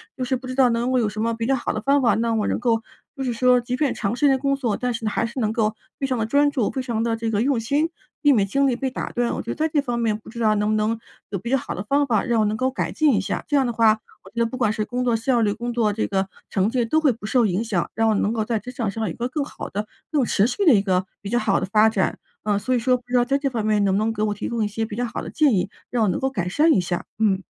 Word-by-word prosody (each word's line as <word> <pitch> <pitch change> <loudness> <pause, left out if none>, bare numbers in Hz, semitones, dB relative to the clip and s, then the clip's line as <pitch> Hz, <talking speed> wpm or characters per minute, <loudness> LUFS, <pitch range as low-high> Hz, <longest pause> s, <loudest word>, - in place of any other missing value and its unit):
就 255 - -3
是 260 +1 0
不 255 - -10
知 255 - -4
道 260 -2 +5
能 235 +2 0
够 260 - +2
有 220 -3 +1
什 215 +1 -5
么 230 +1 0
比 230 0 -3
较 270 - +2
好 250 - -2
的 215 - -3
方 280 +2 +3
法， 230 -5 +3
让 230 0 0
我 210 - 0
能 - - 0
够 230 -2 +1 0.4
就 270 - -3
是 245 - -1
说 250 +1 +4
即 245 +1 -3
便 285 -1 +1
长 200 +4 -2
时 290 - +3
间 265 -1 +3
工 275 0 +1
作， 240 -7 -1
但 250 -1 -1
是 230 -1 -5
还 215 - 0
是 235 +3 -5
能 215 -1 +1
够 220 -1 0 0.2
非 275 - -1
常 255 -2 -1
地 220 - 0
专 285 +5 +3
注、 250 -7 0
非 265 - -3
常 230 -3 -2
地 230 -1 0
这 225 0 -2
个 205 - +1
用 260 -1 +2
心， 285 +8 0 0.3
避 290 -2 +5
免 205 -6 +3
精 275 +7 +2
力 250 - +1
被 260 +1 -2
打 - - -4
断， 240 -1 0
我 - - -3
觉 230 - -9
得 - - -2
在 315 +1 +1
这 295 -2 +1
方 245 -3 -2
面， 225 -2 +1
不 - - -14
知 235 - -9
道 215 -2 +3
能 210 0 0
不 215 - +2
能 215 +1 0 0.3
有 195 - -2
比 235 - -6
较 270 - +3
好 - - -5
的 185 - -5
方 280 +7 +2
法， 225 -7 +1
让 235 -1 +1
我 215 - +2
能 210 - 0
够 255 +4 0
改 265 - -3
进 300 -7 +3
一 - - +2
下？ - - -3
这 290 - +2
样 270 - +3
的 240 - -1
话， 220 -1 +5 0.3
我 190 - -13
觉 - - -32
得 235 0 +2
不 230 - -4
管 245 -5 +1
是 215 -1 -2
工 250 +2 -2
作 240 -2 +2
效 235 +1 +1
率、 210 -2 +2
工 240 +3 -4
作 225 -3 +2
这 215 +2 -1
个 190 -1 -1 0.2
成 195 +1 +2
绩 240 0 0
都 315 +7 +2
会 290 - +4
不 220 -3 -8
受 235 +1 +3
影 190 +3 0
响， 210 -7 -1
让 225 0 +2
我 - - +3
能 205 - +1
够 220 -2 -1
在 225 -2 -1
职 250 +5 -8
场 230 -5 -2
上 225 +3 -4
有 - - -2
一 - - -8
个 240 - -2
更 285 +3 -2
好 280 - -7
的、 210 +2 -4 0.2
更 290 -5 +2
持 210 -2 +2
续 255 +11 -1
的 315 - +7
一 195 - +4
个 185 -1 0 0.2
比 200 - -5
较 240 - +2
好 205 -5 +1
的 - - -2
发 215 +2 +4
展， 200 -4 -1 0.2
啊， 205 -1 +1
所 255 +4 0
以 - - +3
说 250 +2 +2
不 245 - -20
知 250 - -2
道 240 - +3
在 275 +2 +1
这 275 -1 0
方 230 -4 -2
面， 210 -1 +2
你 - - +2
能 190 -1 +2
不 - - +2
能 220 +2 0
给 215 - -4
我 215 -1 +1
提 - - -4
供 235 -2 -1
一 - - +1
些 225 +2 -3
比 210 -1 -7
较 245 - -1
好 230 - -5
的 - - -7
建 295 -7 +3
议， 195 +2 -1 0.2
让 240 -2 +1
我 210 - +2
能 - - -1
够 265 - 0
改 185 -9 -3
善 300 - +3
一 200 - +4
下？ 175 0 -2
嗯。 205 -3 +2
230 Hz, 370 characters per minute, -23 LUFS, 215-255 Hz, 0.4 s, 的